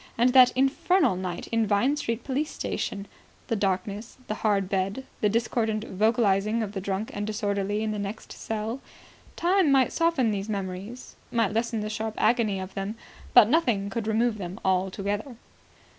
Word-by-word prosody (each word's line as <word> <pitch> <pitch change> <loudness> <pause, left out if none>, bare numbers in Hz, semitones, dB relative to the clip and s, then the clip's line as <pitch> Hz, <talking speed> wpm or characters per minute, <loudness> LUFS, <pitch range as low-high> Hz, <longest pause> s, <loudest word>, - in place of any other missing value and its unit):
And 245 +2 +3
that 255 -2 +8
infernal 320 - +3
night 180 -1 -4
in 230 -1 +2
Vine 220 +8 +2
Street 230 -5 -3
police 285 +3 -1
station... 200 -8 -4 0.4
The 230 - +1
darkness... 200 +2 -2
The - - -1
hard 200 -3 +2
bed... 195 +7 -2
The 210 - +2
discordant 220 -1 0
vocalising 215 0 +1
of 205 - -4
the 195 -2 -4
drunk 195 +3 -3
and 205 +1 -3
disorderly 205 0 -1
in 215 - -1
the 210 - -3
next 205 +2 -6
cell.... 220 +3 -4 0.6
Time 360 -3 +3
might 265 -2 +3
soften 330 -9 +2
these 200 +1 -3
memories, 200 +4 -5 0.2
might 225 -4 +1
lessen 225 0 -1
the 210 - -3
sharp 220 0 -3
agony 220 -5 +2
of 190 0 -7
them; 195 +3 -4 0.4
but 210 - +9
nothing 230 -9 +1
could 220 +1 -3
remove 220 0 +1
them 185 +2 -6
altogether. 200 +5 -1
215 Hz, 165 wpm, -26 LUFS, 200-235 Hz, 0.6 s, but